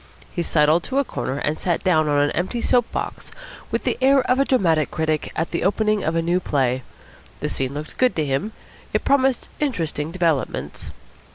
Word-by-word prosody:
He 175 - -2
sidled 155 0 +3
to 265 - -2
a 280 - +4
corner 135 - -4
and 150 +2 -1
sat 175 -3 -1
down 155 -4 +3
on 145 - +2
an 145 - +1
empty 185 +7 -2
soap 240 0 +2
box - - -4 0.4
with - - -2
the - - -1
air 270 +1 +5
of 250 +1 +1
a 275 - +4
dramatic 165 - +2
critic 155 -1 -1
at 165 - -2
the 170 - -1
opening 215 +2 +2
night - - -3
of 160 - 0
a 165 - +1
new 175 +2 +2
play. 130 -6 0 0.6
The - - -2
scene 135 +1 -2
looked 150 +1 -7
good 255 -6 +3
to 155 - 0
him. 140 +10 -1 0.4
It - - 0
promised 270 -2 +2
interesting 165 - -1
developments. 155 - -1
170 Hz, 200 wpm, -22 LUFS, 150-230 Hz, 0.6 s, air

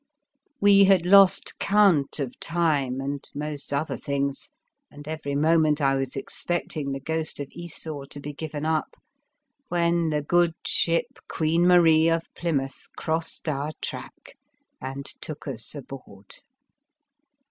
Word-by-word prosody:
We 200 -1 +7
had 190 -3 +4
lost 195 0 +5
count 195 -10 +3
of 130 -3 -4
time 150 -7 0
and 140 +1 -3
most 145 -1 -5
other 145 +3 -1
things, 140 -1 -3 0.4
and 145 0 -12
every 155 -3 -4
moment 155 0 +3
I 135 -2 +3
was 135 -1 -2
expecting 150 0 -3
the 135 - -3
ghost 160 +2 -3
of 145 - -5
Esau 160 -4 -7
to 145 - -9
be 145 +1 -6
given 155 0 -5
up, 160 -1 -1 0.7
when 170 -2 +1
the 150 -1 -1
good 170 +1 +2
ship 175 +10 0
Queen 165 +2 +1
Marie 165 -2 +6
of 165 0 +1
Plymouth 140 -6 -3
crossed 160 +1 -3
our 150 +1 -2
track - - -8 0.4
and 135 +1 -5
took 155 +1 -7
us 125 0 -6
aboard. 125 -8 -10
155 Hz, 135 wpm, -25 LUFS, 140-170 Hz, 0.7 s, We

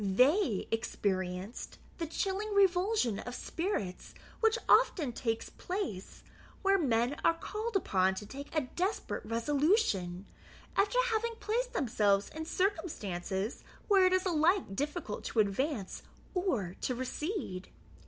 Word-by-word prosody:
They 250 - +3
experienced 190 -2 -2 0.2
the 330 - -2
chilling 395 +5 -2
revulsion 375 - +3
of 245 - -6
spirits 325 - -3 0.2
which 445 0 +3
often 350 - +4
takes 225 -1 -2
place, 360 - -5 0.4
when 390 -8 +3
men 240 +5 +2
are 330 - +4
called 425 +6 -4
upon 190 - +2
to 210 - -6
take 280 +6 -8
a 310 - +4
desperate 375 +4 -1
resolution, 230 - +1 0.5
after 405 +5 +2
having 455 +1 0
placed - - -1
themselves 205 -5 +2
in 320 0 -5
circumstances 220 - -2 0.2
where 390 -3 +6
it 370 - +2
is 370 0 +2
alike 335 - +2
difficult 290 - -3
to 230 - -1
advance 215 +1 0 0.3
or 255 - -1
to 255 - -1
recede. 260 - -4
295 Hz, 125 wpm, -32 LUFS, -, 0.5 s, where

